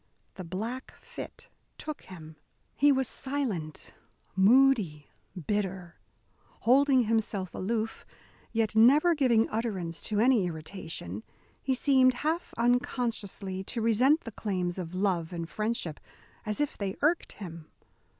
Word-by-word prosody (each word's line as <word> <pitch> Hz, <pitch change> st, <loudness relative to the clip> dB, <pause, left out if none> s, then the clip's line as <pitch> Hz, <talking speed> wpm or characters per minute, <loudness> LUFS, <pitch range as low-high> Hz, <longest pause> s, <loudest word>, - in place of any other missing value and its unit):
The 185 Hz, -, -7 dB
black 220 Hz, +9 st, -5 dB
fit -, -, -10 dB, 0.3 s
took 305 Hz, -1 st, -5 dB
him. 160 Hz, -4 st, -11 dB, 0.4 s
He 290 Hz, +1 st, +5 dB
was 265 Hz, -2 st, +2 dB
silent, 230 Hz, -, -4 dB, 0.4 s
moody, 200 Hz, -, +4 dB, 0.3 s
bitter. 190 Hz, -4 st, -2 dB, 0.6 s
Holding 265 Hz, +1 st, +5 dB
himself 215 Hz, -4 st, -1 dB
aloof, 220 Hz, +3 st, -2 dB, 0.5 s
yet 220 Hz, -1 st, 0 dB
never 285 Hz, +10 st, +6 dB
giving 245 Hz, -7 st, +3 dB
utterance 195 Hz, -7 st, -3 dB
to 210 Hz, -1 st, 0 dB
any 230 Hz, -5 st, +4 dB
irritation, 160 Hz, -, -6 dB, 0.4 s
he 265 Hz, -1 st, 0 dB
seemed 260 Hz, -1 st, +4 dB
half 330 Hz, +3 st, 0 dB
unconsciously 230 Hz, -5 st, -1 dB
to 230 Hz, -, -3 dB
resent 250 Hz, +8 st, +4 dB
the 230 Hz, -, -8 dB
claims 185 Hz, -4 st, -2 dB
of 175 Hz, 0 st, -6 dB
love 185 Hz, -4 st, 0 dB
and 170 Hz, -2 st, -4 dB
friendship, 210 Hz, -5 st, -2 dB, 0.5 s
as 210 Hz, -, -1 dB
if 295 Hz, -1 st, -1 dB
they 195 Hz, -2 st, -2 dB
irked 320 Hz, +3 st, +2 dB
him. 170 Hz, -5 st, -9 dB
215 Hz, 120 wpm, -29 LUFS, 185-255 Hz, 0.6 s, never